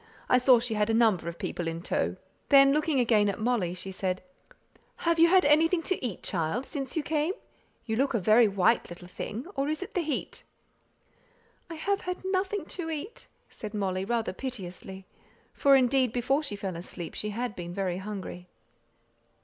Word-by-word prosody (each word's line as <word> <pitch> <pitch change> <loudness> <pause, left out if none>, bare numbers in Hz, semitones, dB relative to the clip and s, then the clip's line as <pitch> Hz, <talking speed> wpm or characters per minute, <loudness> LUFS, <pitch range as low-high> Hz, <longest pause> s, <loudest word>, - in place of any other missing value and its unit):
I 250 - +5
saw 255 0 +6
she 235 -1 -1
had 210 0 +1
a 225 - +2
number 215 -8 +3
of 170 - -8
people 175 0 -4
in 165 +1 -4
tow;" - - -1 0.3
then 275 -1 +7
looking 305 -2 +1
again 220 -4 +3
at 200 - -3
Molly, 215 -7 0
she 190 +1 -5
said, 185 -1 -2 0.8
"Have 335 0 +2
you 335 - +8
had 370 +1 +5
anything 325 +4 +4
to 375 -5 -2
eat, 230 -7 -4
child, 180 +9 -1
since 275 -1 -5
you 315 - 0
came? 310 +4 0 0.5
You 220 - -1
look 270 0 +1
a - - +2
very 220 +4 +5
white 200 +3 +2
little 175 +1 -10
thing; 215 +6 -6
or 275 -2 -1
is 310 +4 -2
it 390 - -11
the 360 - +1
heat?" 305 -4 -3 1.3
"I 330 - -6
have 395 +5 -1
had 360 0 -3
nothing 380 +1 -1
to 335 -3 -3
eat," 325 +8 -6 0.2
said 215 0 -8
Molly, 190 -2 -1
rather 225 0 -1
piteously; 190 -5 -6 0.5
for, 275 -1 +5
indeed, 255 -1 +3
before 270 +4 +1
she 275 -9 -3
fell 195 -3 -4
asleep 170 0 -6
she 210 - -3
had 230 0 -3
been 175 -1 -6
very 185 -1 -2
hungry. 190 -2 -7
240 Hz, 185 wpm, -28 LUFS, 190-295 Hz, 1.3 s, you